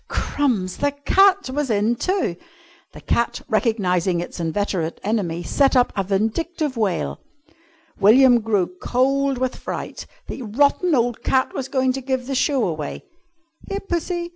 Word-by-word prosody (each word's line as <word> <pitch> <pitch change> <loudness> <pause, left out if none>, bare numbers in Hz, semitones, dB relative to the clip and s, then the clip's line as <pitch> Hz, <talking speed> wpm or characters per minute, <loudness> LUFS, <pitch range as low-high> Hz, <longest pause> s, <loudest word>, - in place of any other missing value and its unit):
Crumbs! 220 -11 -1
The 285 -1 0
cat 380 +3 +3
was 290 0 -2
in 215 +2 +2
too! 370 - -1 0.6
The - - -12
cat, 235 - 0
recognising 185 -6 +1
its 175 - -6
inveterate 170 0 -2
enemy, 185 -6 -1
set 275 +8 +2
up 250 -1 +3
a 195 - 0
vindictive 260 - -1
wail. 180 - -1 0.8
William 240 +4 +6
grew 200 -5 0
cold 275 +2 +1
with 255 0 -1
fright. - - -6 0.2
The - - -7
rotten 285 - +2
old 240 -2 0
cat 260 0 +1
was 265 - -4
going 260 -1 +1
to 270 - -4
give 260 -1 -2
the 270 - -4
show 265 -2 +1
away! 155 -4 -5 0.6
"Here, 395 - -2
Pussy! 345 -2 -3
245 Hz, 145 wpm, -22 LUFS, 200-280 Hz, 0.8 s, William